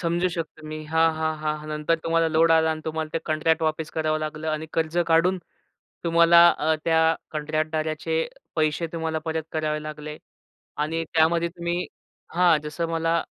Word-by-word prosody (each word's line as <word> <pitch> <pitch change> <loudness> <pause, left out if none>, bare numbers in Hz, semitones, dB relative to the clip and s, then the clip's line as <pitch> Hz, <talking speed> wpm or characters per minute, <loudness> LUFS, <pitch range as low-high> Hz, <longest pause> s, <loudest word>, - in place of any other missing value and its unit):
समजू 170 +1 +1
शकतो 165 -3 -6
मी 155 0 -6
हां, 160 +1 +3
हां, 160 0 -1
हां. 155 0 -3
नंतर 150 +2 0
तुम्हाला 165 0 +2
लोड 160 +1 +3
आलं 160 0 +4
आणि 155 0 -3
तुम्हाला 160 0 -3
ते - - 0
कॉन्ट्रॅक्ट 160 +1 +1
वापस 155 0 -1
करावं 155 -1 0
लागलं. 155 0 -4
आणि 155 0 -2
कर्ज 165 +1 -1
काढून 170 +3 +3 0.7
तुम्हाला 170 0 +6
अ, 160 +1 +2
त्या 165 -1 +3 0.3
कॉन्ट्रॅक्टदाराचे 155 +1 -2 0.3
पैसे 155 +1 +1
तुम्हाला 160 -1 -2
परत 160 0 -2
करावे 155 -1 -1
लागले. 150 0 -7 0.6
आणि 160 +2 -1
त्यामध्ये 165 +1 +3
तुम्ही 170 +1 -3 0.5
हां, 175 -2 +5
जसं 165 +2 -3
मला 165 0 0
160 Hz, 155 wpm, -24 LUFS, 155-165 Hz, 0.7 s, तुम्हाला